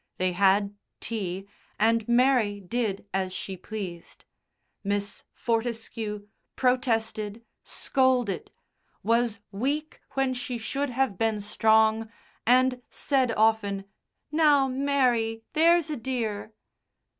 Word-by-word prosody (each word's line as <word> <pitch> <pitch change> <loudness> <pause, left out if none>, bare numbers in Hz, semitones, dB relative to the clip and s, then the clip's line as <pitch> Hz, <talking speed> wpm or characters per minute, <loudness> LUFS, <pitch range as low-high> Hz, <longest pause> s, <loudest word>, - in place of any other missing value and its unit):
They 185 0 +1
had 200 +2 +3 0.3
tea, 195 -4 -4 0.3
and 225 +1 +2
Mary 240 -4 +3
did 200 0 -2
as 190 -1 0
she 190 0 -5
pleased. 185 -3 -8 0.6
Miss 200 0 -2
Fortescue 225 -3 -3 0.3
protested, 225 -4 0 0.2
scolded, 255 -6 +1 0.5
was 230 -1 +1
weak 280 +9 -2
when 270 -1 +1
she 250 0 -4
should 275 +5 -2
have 250 -6 0
been 225 -2 +1
strong, 220 +1 +3 0.4
and 250 +1 +4
said 265 -4 +1
often, 215 -3 +2 0.5
"Now, 300 -3 +4
Mary, 255 -4 +1
there's 330 0 +4
a 300 - -2
dear." 225 -4 -3
225 Hz, 100 wpm, -27 LUFS, 205-255 Hz, 0.6 s, and